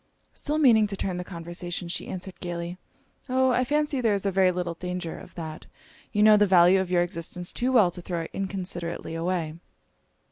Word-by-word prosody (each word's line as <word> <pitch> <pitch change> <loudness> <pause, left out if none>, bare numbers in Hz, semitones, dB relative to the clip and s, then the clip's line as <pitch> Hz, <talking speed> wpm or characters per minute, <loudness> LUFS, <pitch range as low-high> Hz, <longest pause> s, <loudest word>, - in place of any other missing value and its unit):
Still 300 +1 -2
meaning 230 -8 +5
to 200 - -4
turn 185 -2 -2
the 180 - -3
conversation, 175 0 -6
she 170 - -4
answered 185 0 -7
gaily 175 0 -5 0.5
'O, 260 0 +3
I 250 +1 +2
fancy 295 0 0
there 220 -4 +3
is 200 - -3
very 190 -1 +3
little 175 -1 -2
danger 180 -1 -5
of - - -12
that 160 -2 -7 0.4
you 210 - +2
know 215 0 +8
the 205 0 +4
value 185 0 +6
of 185 - -4
your 175 -1 +3
existence 175 +1 -4
too 250 +2 0
well 215 -9 +5
to 175 - -8
throw 170 -1 -3
it 165 - -7
inconsiderately 180 -4 -4
away.' 165 -1 -2
180 Hz, 190 wpm, -26 LUFS, 175-210 Hz, 0.5 s, know